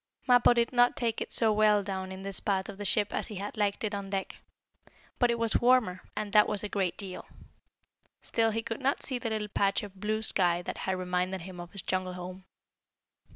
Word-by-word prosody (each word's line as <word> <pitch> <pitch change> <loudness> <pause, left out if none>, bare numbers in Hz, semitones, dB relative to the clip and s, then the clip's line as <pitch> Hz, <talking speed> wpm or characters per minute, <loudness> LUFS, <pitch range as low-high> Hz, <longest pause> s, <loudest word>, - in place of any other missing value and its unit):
Mappo 245 -2 +6
did 235 +1 +1
not 245 0 +3
like 230 -2 -1
it - - -4
so 220 -2 +4
well 210 -1 +4
down 190 -1 -4
in 190 0 -8
this 195 -1 +3
part 195 -1 -1
of 200 0 -9
the 205 - -4
ship 205 +1 +3
as - - -2
he 215 - -8
had 200 +2 -5
liked 205 -1 -1
it 215 -1 -1
on 200 -1 -4
deck. 195 -1 -3 0.8
But 245 - +4
it 235 - +1
was 230 -1 +1
warmer, 240 -7 +3
and 210 -1 -4
that 210 -1 +6
was 210 -2 -1
a 210 - -3
great 190 -4 -1
deal. 190 -3 -7 0.9
Still 225 -1 +1
he 225 +1 -2
could 225 +3 -5
not 275 +2 0
see 255 -2 -1
the 230 - -3
little 215 -1 -2
patch 200 0 +1
of 195 -2 -10
blue 215 +2 -1
sky 175 -4 +1
that - - -5
had 190 - 0
reminded 180 0 -2
him 180 0 -9
of 175 0 -8
his 200 -3 -6
jungle 185 -1 -2
home. 180 +1 -8
205 Hz, 225 wpm, -29 LUFS, 190-220 Hz, 0.9 s, Mappo